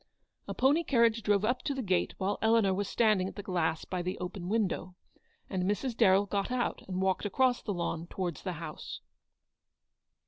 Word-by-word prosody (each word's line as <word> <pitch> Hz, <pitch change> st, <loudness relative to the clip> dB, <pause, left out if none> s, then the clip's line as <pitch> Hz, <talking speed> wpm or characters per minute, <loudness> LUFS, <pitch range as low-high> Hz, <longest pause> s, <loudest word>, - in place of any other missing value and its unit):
A -, -, -4 dB
pony 285 Hz, +6 st, +3 dB
carriage 235 Hz, -5 st, +3 dB
drove 205 Hz, -1 st, +2 dB
up 250 Hz, +3 st, 0 dB
to 280 Hz, -, -2 dB
the 265 Hz, -, -3 dB
gate 185 Hz, -3 st, 0 dB
while 195 Hz, +1 st, -1 dB
Eleanor 220 Hz, -3 st, +4 dB
was 195 Hz, +1 st, -2 dB
standing 215 Hz, -5 st, +3 dB
at -, -, -8 dB
the 205 Hz, -, -6 dB
glass 170 Hz, -4 st, -1 dB
by 180 Hz, -1 st, -3 dB
the 180 Hz, +1 st, -3 dB
open 180 Hz, 0 st, -5 dB
window, 195 Hz, -4 st, -1 dB, 0.5 s
and 190 Hz, -2 st, -2 dB
Mrs. 210 Hz, +6 st, -1 dB
Darrell 200 Hz, -3 st, +5 dB
got 200 Hz, 0 st, -1 dB
out 250 Hz, -1 st, -1 dB
and 185 Hz, 0 st, -2 dB
walked 190 Hz, -1 st, +1 dB
across 250 Hz, +5 st, +2 dB
the 210 Hz, -, -3 dB
lawn 170 Hz, -2 st, -3 dB
towards 175 Hz, -3 st, -4 dB
the 185 Hz, -, -3 dB
house. 165 Hz, -2 st, -7 dB
200 Hz, 185 wpm, -30 LUFS, 185-230 Hz, 0.5 s, Darrell